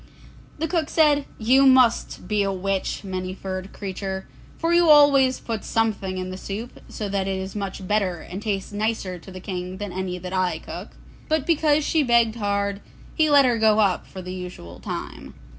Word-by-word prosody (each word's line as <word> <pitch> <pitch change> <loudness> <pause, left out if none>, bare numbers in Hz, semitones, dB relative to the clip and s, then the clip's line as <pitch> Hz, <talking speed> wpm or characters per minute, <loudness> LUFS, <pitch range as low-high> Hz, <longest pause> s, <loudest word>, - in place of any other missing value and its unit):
The 320 +2 -1
cook 325 -2 -1
said, 295 -3 +3
'You 260 +5 +5
must 255 -3 +3
be 210 -1 +1
a 195 -1 +1
witch, 195 +1 -2
Many 185 -1 -4
furred 190 0 -6
Creature, 190 -1 -5 0.3
for 330 +1 0
you 345 -1 +5
always 280 -3 +6
put 225 -3 -4
something 205 -4 -1
in 185 0 -4
the 185 - -7
soup, 215 +6 -6
so 210 - -4
that 195 -1 -1
it 190 -1 -1
is 190 +1 -6
much 195 -2 -5
better 195 -4 +1
and 185 +3 -7
tastes 200 -2 -3
nicer 205 -3 -2
to 190 - -13
the 185 - -8
King 185 0 -5
than 205 -1 -5
any 185 0 -3
that 180 +1 -7
I 185 -1 +1
cook.' - - -9 0.3
But 310 -2 +1
because 305 -2 +2
she 320 - +2
begged 235 -3 +3
hard, 200 -1 -1 0.3
he 310 -2 +2
let 285 -2 +6
her 240 -2 +2
go 215 -1 +4
up 200 -4 +2
for 185 - -9
the 180 +1 -6
usual 180 - -8
time. - - -7
200 Hz, 195 wpm, -24 LUFS, 185-255 Hz, 0.3 s, always